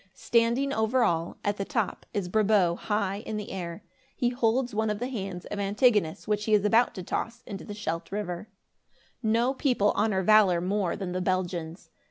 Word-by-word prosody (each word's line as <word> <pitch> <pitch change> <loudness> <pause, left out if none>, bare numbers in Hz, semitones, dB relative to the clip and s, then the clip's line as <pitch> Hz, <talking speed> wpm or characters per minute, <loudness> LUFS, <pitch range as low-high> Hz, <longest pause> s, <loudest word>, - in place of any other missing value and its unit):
Standing 235 +4 +1
over 225 +2 +2
all, 170 -5 0
at 205 0 0
the 195 - -2
top, 220 -3 -2
is 200 -3 -2
Brabo 200 -3 +3
high 200 0 -1
in 215 0 -4
air. 180 -4 -6 0.3
He 245 - +1
holds 245 0 0
one 220 +1 0
of 210 - -1
the 245 +4 -3
hands 195 -7 -5
of 205 - -5
Antigonus, 205 -4 +2
which 210 0 0
he 215 - +4
is 205 0 +2
about 230 +3 +3
to 185 - -5
toss 235 +6 -4
into 200 -6 -7
the 205 - -7
Scheldt 165 -5 -4
River. 200 0 -4 0.7
No 230 +3 +2
people 250 -7 +2
honor 205 -3 +1
valor 200 -3 +5
more 185 0 0
than 190 -3 -4
the 185 +1 -2
Belgians. 175 -2 -2
210 Hz, 185 wpm, -27 LUFS, 185-225 Hz, 0.7 s, valor